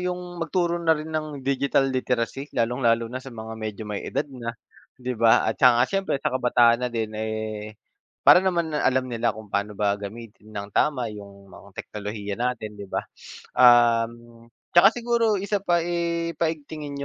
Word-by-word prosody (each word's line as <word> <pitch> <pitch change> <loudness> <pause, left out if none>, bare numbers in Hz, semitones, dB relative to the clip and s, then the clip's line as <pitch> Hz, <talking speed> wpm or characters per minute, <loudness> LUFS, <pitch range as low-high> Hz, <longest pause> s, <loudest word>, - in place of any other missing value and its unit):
yung 180 -1 -4
magturo 170 0 0
na 165 -1 +4
rin 155 +1 -7
ng 155 -3 -3
digital 135 0 +1
literacy, 130 +2 -2
lalong-lalo 115 -1 +2
na 130 +1 -5
sa 135 - -10
mga 110 -1 -7
medyo 110 0 -5
may 105 - -3
edad - - -2
na, 115 -2 -5 0.5
'di 125 0 -3
ba? 115 0 +5
At 110 - -1
saka 125 -2 +6
siyempre 195 -6 -1
sa 150 - 0
kabataan 120 -1 +3
na - - 0
din, 110 -2 -2
eh, 110 -1 -4 0.5
para 180 - +8
naman, 170 -4 0
ah, - - -1
alam 130 0 +1
nila 115 0 0
kung 110 -1 -10
paano 100 +1 -1
ba 100 -1 +1
gamitin 110 +1 -10
nang 100 -1 -5
tama 135 -6 +1
yung 100 -1 -12
mga 100 - -14
teknolohiya 105 -1 -5
natin, 120 -4 -2
'di 100 - -8
ba? - - -2 0.5
Um, 120 -1 +4 0.3
tsaka 175 +3 +8
siguro 235 -2 +1
isa 200 +1 -1
pa 175 -2 +2
eh 170 -1 -1
paigtingin 150 -3 -3
125 Hz, 175 wpm, -24 LUFS, 110-160 Hz, 0.5 s, para